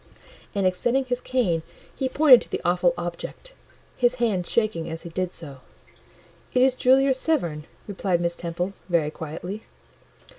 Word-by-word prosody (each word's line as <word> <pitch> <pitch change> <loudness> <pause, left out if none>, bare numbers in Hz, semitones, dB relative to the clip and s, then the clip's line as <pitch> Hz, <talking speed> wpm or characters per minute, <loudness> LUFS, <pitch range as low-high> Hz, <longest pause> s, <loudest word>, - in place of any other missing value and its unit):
And 200 -1 +1
extending 240 +9 +1
his 250 0 -2
cane 225 -12 0 0.3
he 265 -2 -1
pointed 280 -3 +7
to - - -12
the - - -3
awful 175 0 +3
object, 175 - -6 0.4
his 245 0 +2
hand 215 -8 0
shaking 215 -8 0
as 160 0 -6
he 170 - -8
did 185 +1 -2
so. 145 -7 -9 1.0
"It 250 - +5
is 260 -1 +4
Julia 265 +2 +4
Severn," 175 - -1 0.2
replied 190 -3 0
Miss 170 0 0
Temple, 175 +3 -3 0.2
very 160 -4 +1
quietly. 165 +7 -6
185 Hz, 150 wpm, -25 LUFS, 170-250 Hz, 1.0 s, pointed